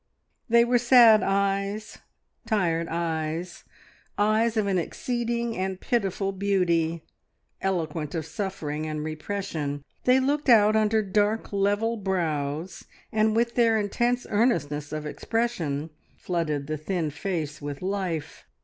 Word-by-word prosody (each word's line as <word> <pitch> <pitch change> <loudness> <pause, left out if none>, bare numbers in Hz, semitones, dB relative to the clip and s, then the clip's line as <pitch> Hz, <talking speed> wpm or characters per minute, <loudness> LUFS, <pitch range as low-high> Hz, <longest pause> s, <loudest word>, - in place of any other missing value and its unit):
They 235 +1 +6
were 245 0 +3
sad 235 -3 +7
eyes, 200 +2 -1 0.5
tired 170 -7 +1
eyes, 165 +1 -3 0.5
eyes 220 +2 +2
of 215 - +2
an 195 -2 +1
exceeding 235 +4 -2
and 190 0 -3
pitiful 195 -4 -1
beauty, 175 -4 0 0.6
eloquent 165 -5 -2
of 160 -2 -2
suffering 160 -4 -4
and 155 -1 -3
repression. 155 -3 -4 0.2
They 255 +1 +5
looked 285 +2 0
out 215 -2 +6
under 220 0 +3
dark, 210 +2 0
level 205 +4 +1
brows, 165 -4 -2 0.3
and 215 0 +2
with 235 +1 +1
their 230 -2 +3
intense 240 +4 0
earnestness 150 - 0
of 155 0 -4
expression 165 -6 -2 0.3
flooded 155 -5 -2
the 155 +1 -3
thin 160 0 -2
face 155 -2 -4
with 145 +2 -6
life. 185 -5 -3
195 Hz, 120 wpm, -26 LUFS, 160-220 Hz, 0.6 s, sad